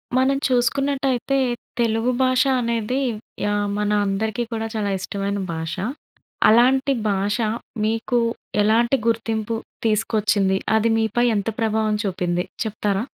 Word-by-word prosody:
మనం 265 +1 +3
చూసుకున్నట్టయితే 270 +1 +1 0.4
తెలుగు 230 +1 +1
భాష 255 0 +4 0.2
అనేది 235 +2 -1 0.4
యాహ్! 205 0 0
మన 210 0 0
అందరికీ 215 +4 -1
కూడా 225 -1 -2
చాలా 205 -2 -1
ఇష్టమైన 200 +1 -3
భాష. 160 0 -4 0.7
అలాంటి 260 +5 +4 0.2
భాష 200 +1 0 0.5
మీకు 225 +3 0 0.4
ఎలాంటి 235 +5 +3
గుర్తింపు 225 -1 -1 0.3
తీసుకొచ్చింది? 210 -3 +2 0.2
అది 225 +1 +2
మీపై 225 +2 +1
ఎంత 205 +1 -1
ప్రభావం 220 -1 +1
చూపింది 180 -3 -1 0.2
చెప్తారా? 210 -2 -1
220 Hz, 110 wpm, -22 LUFS, 205-240 Hz, 0.7 s, భాష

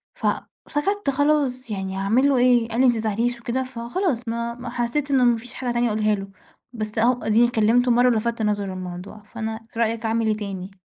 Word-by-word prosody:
فسَكَتّ 400 - -2
خلاص 275 -3 +1
يعني 190 -1 -3
هاعمل 225 +8 +3
له 275 - +3
إيه؟ 245 -2 +4
قال 230 +3 0
لي: 265 - +6
"ما 245 - +5
تزعليش" 230 +2 -1
وكده 245 +3 -1
فخلاص 255 - -2
ما 235 +1 -2
ما 245 0 -7
حسّيت 250 +4 -1
إنه 265 -2 +4
ما 240 -1 +4
فيش 235 +2 -9
حاجة 250 -1 -3
تانية 240 0 +2
أقولها 215 -1 +1
له. 195 -1 -6 0.5
بس 215 -1 -5
أهو 245 +3 +2
أدِيني 225 +2 +4
كلّمته 240 +2 +3
مرة 245 +1 +4
ولفَتَّ 230 0 0
نظره 210 -1 0
للموضوع، 185 +3 -8
فأنا 225 0 -6
في 230 - -6
رأيك 230 0 0
أعمل 225 0 +1
إيه 215 -1 +1
تاني؟ 195 -2 -7
235 Hz, 195 wpm, -23 LUFS, 215-250 Hz, 0.5 s, لي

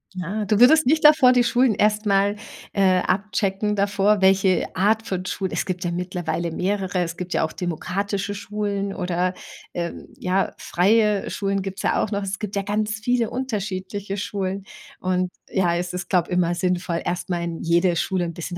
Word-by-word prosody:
Na, 190 +4 -3
du 210 +1 +1
würdest 305 +5 +7
nicht 310 +2 +3
davor 300 -4 +8
die 245 -1 +4
Schulen 245 -1 +3
erst 210 +1 +1
mal, 200 +1 +2 0.4
äh, 190 -2 +3
abchecken 200 +1 -1
davor, 200 +1 +2
welche 190 -1 +3
Art 220 +4 +2
von 185 -1 -3
Schule 190 0 -3
es - - -1
gibt 180 -1 -3
ja 170 - 0
mittlerweile 175 -1 -3
mehrere. 190 +1 -1
Es 165 -1 -3
gibt 180 0 -5
ja - - +2
auch - - -7
demokratische 195 +4 -3
Schulen 200 -1 -3
oder, 180 0 -1 0.4
ähm, 170 -1 -5
ja, 185 +2 0
freie 210 +2 +2
Schulen 195 -1 -1
gibt's 195 0 -6
ja - - +2
auch 215 - -4
noch. 200 0 -1
Es 195 +1 -4
gibt 205 -1 -4
ja - - +1
ganz 210 +1 -1
viele 235 +1 0
unterschiedliche 205 -5 -4
Schulen. 195 -1 -3 0.4
Und 185 0 0 0.2
ja, 175 -3 +1
es 180 0 -3
ist, 180 - -5
glaube 180 -3 +2
immer 175 -1 +1
sinnvoll, 175 -1 -1
erst 175 +1 -3
mal 175 -1 -1
in 170 -1 -4
jede 170 +1 +2
Schule 180 +1 0
'n 170 - -5
bisschen 175 +1 -6
195 Hz, 185 wpm, -23 LUFS, 180-210 Hz, 0.4 s, davor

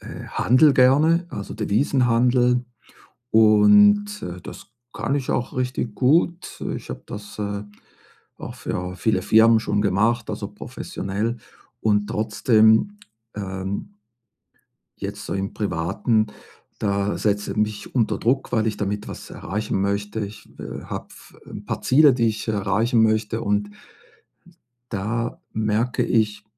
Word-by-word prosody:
äh, - - -9
handle 135 +5 +4
gerne, 155 +7 +4
also, 100 - -6
Devisenhandel 125 +2 +2 0.7
und, 205 - +5
äh, 90 0 -6
das - - -10 0.3
kann 140 - -1
ich 135 -3 -3
auch 120 - -2
richtig 125 -3 -2
gut. 170 +6 +1
Ich - - -9
habe - - -7
das, 105 +1 -9
äh, 100 0 -3 0.8
auch - - -8
für 90 0 -4
viele 95 +1 +1
Firmen 110 +2 +5
schon 105 - 0
gemacht, 110 +4 +1
also, - - -4
professionell 105 +5 -4 0.4
und 105 -1 +2
trotzdem, 110 - +3 0.4
ähm, 95 - -5 1.0
jetzt - - -6
so - - -3
im 95 0 -3
Privaten, 105 +4 0 0.5
da 100 0 0
setze 105 0 -1
mich 105 -1 -2
unter 120 -4 +1
Druck, 130 +3 0
weil 110 -2 +1
ich 110 -2 -1
damit 105 0 -3
was - - -9
erreichen 100 +1 -3
möchte. 100 +2 -2
Ich, 105 - -13
äh, - - -7
habe - - -6
f - - -16
'n - - -9
paar - - -3
Ziele, 145 +1 +6
die 120 -2 +1
ich 110 +1 -4
erreichen 110 +3 +1
möchte 110 0 +1
und 105 0 0 1.2
da 115 +3 -3
merke 110 +3 0
ich 105 -2 0
110 Hz, 130 wpm, -23 LUFS, 105-125 Hz, 1.2 s, Ziele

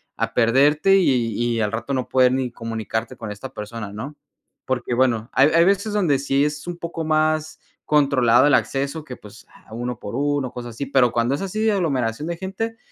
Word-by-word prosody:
a - - -2
perderte 145 +10 +4
y 125 - +2 0.2
y 115 - -1
al 105 - 0
rato 115 +5 -4
no 130 -2 -1
poder 130 -1 +4
ni 130 -2 -1
comunicarte 115 +1 -4
con 110 -2 -6
esta 130 +6 -8
persona, 105 -1 -7
¿no? 125 +9 -7 0.5
Porque 125 -1 -2
bueno, 120 -2 +1
hay 135 +3 +5
hay 165 +1 +4
veces 200 +2 +1
donde 170 -10 +2
sí 140 +1 +1
es 150 +2 -4
un 175 -1 -5
poco 170 -1 -5
más 155 0 0 0.3
controlado 135 -4 +4
el 145 - +4
acceso 140 +3 0
que, 130 -4 -8
pues, 105 0 -15 0.2
a 110 - -13
uno 120 0 -4
por 100 - -7
uno 145 -1 0
o - - -22
cosas 120 -2 -7
así. 140 - -4
Pero 125 -4 +3
cuando 120 +3 +1
es - - -6
así 195 +2 -4
de 220 -1 +3
aglomeración 140 - -1
de 170 -1 -3
gente, 200 +5 -4
135 Hz, 210 wpm, -22 LUFS, 120-155 Hz, 0.5 s, hay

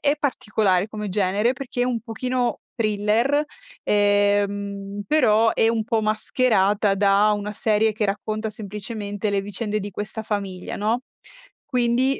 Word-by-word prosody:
è 290 0 +2
particolare 210 -8 +1
come 210 -1 -5
genere 200 +4 +1
perché 255 -2 -4
è - - +3
un 245 -2 -1
pochino 245 +2 -2 0.2
thriller, 225 +6 +1 0.4
ehm, 205 -1 +1
però 225 -6 +4
è 225 - +3
un 225 -1 0
po' 225 0 +1
mascherata 215 -2 +2
da 200 +1 +4
una 205 0 -4
serie 215 +1 +2
che 215 0 -1
racconta 215 +2 -2
semplicemente 205 0 -5
le 200 -1 +1
vicende 205 +2 -3
di 205 0 -5
questa 205 +3 -5
famiglia, 195 -4 -4
no, 220 +4 0 0.6
quindi 250 +1 +1
210 Hz, 140 wpm, -23 LUFS, 205-230 Hz, 0.6 s, però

